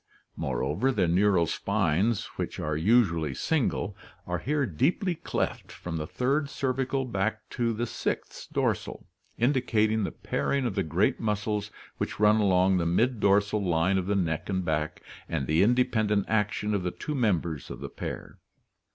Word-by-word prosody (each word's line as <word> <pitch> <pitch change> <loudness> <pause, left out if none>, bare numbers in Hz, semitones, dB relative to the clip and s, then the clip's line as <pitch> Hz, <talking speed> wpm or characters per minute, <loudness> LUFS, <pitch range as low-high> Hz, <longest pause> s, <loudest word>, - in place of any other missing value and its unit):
Moreover, 70 - 0
the 105 - +1
neural 90 0 +3
spines, 95 +7 +1
which - - -4
are 75 0 -1
usually 85 - +2
single, 120 - 0 0.3
are 90 -1 -2
here 145 - 0
deeply 175 - +1
cleft 160 - -3
from 85 -2 -5
the 75 -1 -4
third 140 - 0
cervical 135 0 -1
back 110 -2 -2
to 120 -1 0
the 115 +2 -2
sixth - - -4
dorsal, - - -1 0.3
indicating 110 -4 +2
the - - -2
pairing 140 -2 -1
of 120 - -1
the 100 - 0
great 85 +3 +1
muscles 105 -1 -1 0.3
which - - -3
run 105 +1 +5
along 95 -2 +3
the 85 -2 0
mid 115 +7 +2
dorsal 100 +1 +3
line 90 +2 +2
of 90 - -4
the 100 - +1
neck 80 -4 -1
and 95 -2 -1
back, 75 -1 -2 0.3
and 75 -5 -1
the 80 +4 +2
independent 110 -3 +2
action 105 -1 0
of 100 - +1
the 90 - -1
two 150 - -5
members 85 - 0
of - - -7
the - - -5
pair. - - -7
105 Hz, 160 wpm, -28 LUFS, 85-120 Hz, 0.3 s, run